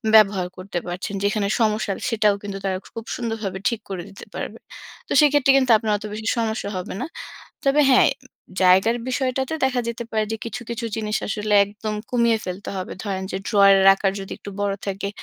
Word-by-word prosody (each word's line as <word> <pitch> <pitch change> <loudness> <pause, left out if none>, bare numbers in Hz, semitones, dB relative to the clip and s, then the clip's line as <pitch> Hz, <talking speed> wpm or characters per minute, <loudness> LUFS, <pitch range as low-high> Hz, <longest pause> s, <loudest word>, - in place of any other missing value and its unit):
ব্যবহার 195 -4 +5
করতে 185 0 -5
পারছেন। 180 +3 -4
যেখানে 205 0 +1
সমস্যা 215 -2 +1 0.2
সেটাও 215 -3 +3
কিন্তু 200 -1 -5
তারা 190 -1 0 0.2
খুব 230 0 -6
সুন্দরভাবে 225 -5 -3
ঠিক 235 - -3
করে 185 -3 -4
দিতে 195 - -12
পারবে। - - -5 0.5
তো - - -14
সেক্ষেত্রে 290 -2 +5
কিন্তু 260 -2 +3
আপনার 215 -1 -2
অত 205 - -12
বেশি 215 +1 -5
সমস্যা 220 -2 -1
হবে 180 - -5
না। - - -1 0.6
তবে 275 +2 +4
হ্যাঁ, 255 - +6 0.2
উম - - -17 0.3
জায়গার 190 +6 +5
বিষয়টাতে 260 +2 -1
দেখা 255 -2 +1
যেতে 235 0 -4
পারে 215 -1 +1
যে 225 - -1
কিছু, 230 - -5
কিছু 235 0 -4
জিনিস 215 -1 -1
আসলে 210 0 -1
একদম 210 +1 -5 0.2
কমিয়ে 235 -2 +3
ফেলতে 185 +2 -6
হবে। 185 -1 -4
ধরেন 195 -3 -3
যে - - -1
ড্রয়ারের 195 -1 +6
আকার 195 0 0
যদি 195 - -7
একটু 200 - -9
বড় 200 -1 0
থাকে, 195 0 -3
215 Hz, 190 wpm, -22 LUFS, 195-235 Hz, 0.6 s, হ্যাঁ